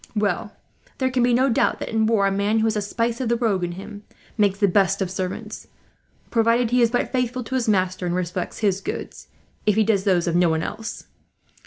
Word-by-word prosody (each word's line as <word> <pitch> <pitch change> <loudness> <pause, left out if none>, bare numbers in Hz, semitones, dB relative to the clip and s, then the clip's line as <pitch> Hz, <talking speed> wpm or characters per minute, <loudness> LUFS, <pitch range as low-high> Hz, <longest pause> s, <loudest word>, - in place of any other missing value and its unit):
"Well, 205 -1 -1 0.5
there 260 -1 0
can 255 -1 +1
be 245 +1 +3
no 255 +3 +3
doubt 235 - +1
that, - - -5
in 220 -1 +1
war, 220 -3 +3
a 195 - +2
man 200 +3 +1
who 220 - +2
has 220 0 +1
a 210 - 0
spice 230 +4 -2
of 245 - -1
the 235 - +3
rogue 210 -6 0
in 175 0 -2
him 205 +3 -9 0.3
makes 205 -3 +2
the 200 -1 +3
best 195 +1 +2
of 190 -2 -2
servants; 185 -1 -5 0.6
provided 230 0 +2
he 250 0 +3
is 235 - +4
but 245 +1 -1
faithful 250 -1 -1
to 245 - -8
his 250 -3 0
master, 185 -2 0
and 175 - -1
respects 180 0 -3
his 195 -2 +1
goods, - - -6 0.4
if 210 - +4
he 220 - +4
does 205 -3 +1
those 180 -4 +2
of 170 -1 0
no 175 -1 +4
one 160 0 0
else. 225 +1 -6
210 Hz, 230 wpm, -23 LUFS, 190-230 Hz, 0.6 s, is